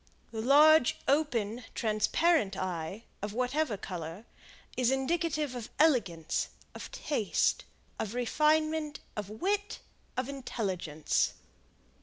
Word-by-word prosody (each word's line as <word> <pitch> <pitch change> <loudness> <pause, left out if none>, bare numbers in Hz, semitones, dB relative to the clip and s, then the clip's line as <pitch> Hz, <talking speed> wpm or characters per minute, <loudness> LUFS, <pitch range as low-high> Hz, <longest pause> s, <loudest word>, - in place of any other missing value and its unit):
The 220 -1 -3
large, 295 +2 +6
open, 250 -6 +1
transparent 215 - +2
eye, 185 +3 -3 0.2
of 205 0 -4
whatever 250 0 0
color, 180 +1 -6 0.5
is 250 -1 +2
indicative 300 +1 0
of 240 -3 -6
elegance, 200 - +2 0.3
of - - -8
taste, 290 - 0 0.3
of 220 +2 -3
refinement, 305 +4 +1 0.2
of 205 -2 -4
wit, 405 - -1 0.4
of 255 0 0
intelligence. 190 - -1
245 Hz, 100 wpm, -31 LUFS, 205-305 Hz, 0.5 s, large